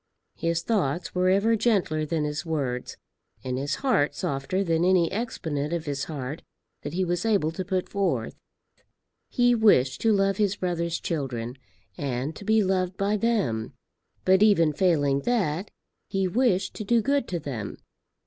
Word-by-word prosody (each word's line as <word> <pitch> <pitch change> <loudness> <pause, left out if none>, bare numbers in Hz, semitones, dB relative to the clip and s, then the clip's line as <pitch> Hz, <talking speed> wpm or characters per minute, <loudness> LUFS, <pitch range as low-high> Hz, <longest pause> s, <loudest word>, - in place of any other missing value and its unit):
His 165 0 -1
thoughts 175 -7 -1
were 185 0 +2
ever 200 +4 +3
gentler 195 -9 +1
than 160 -1 -1
his 150 +1 -2
words, 140 -7 -3 0.5
and 130 0 -2
his 140 +1 -1
heart 225 - +2
softer 140 +8 -1
than 165 -2 +1
any 180 -2 +3
exponent 165 -9 -3
of 170 -1 -2
his 140 -2 -2
heart 145 -1 -5 0.4
that 145 - -6
he 185 +1 0
was 175 +1 -1
able 200 -9 +2
to 185 +3 -4
put 185 0 -2
forth. 200 -1 -1 1.0
He 245 -1 +3
wished 170 - +3
to 225 - +3
love 195 -1 +2
his 205 -2 +1
brother's 170 -3 -2
children, 125 -7 -3 0.4
and 135 +2 -2
to - - -9
be 220 +1 +3
loved 185 -1 0
by 200 +2 +1
them; 200 - 0 0.5
but 190 +1 +5
even 170 -8 +5
failing 145 -5 +2
that, 190 -3 -1 0.4
he 195 -1 0
wished 195 -2 +1
to - - -4
do 230 +2 +2
good 280 0 +1
to 175 - -2
them. 125 -9 -5
175 Hz, 160 wpm, -26 LUFS, 145-200 Hz, 1.0 s, but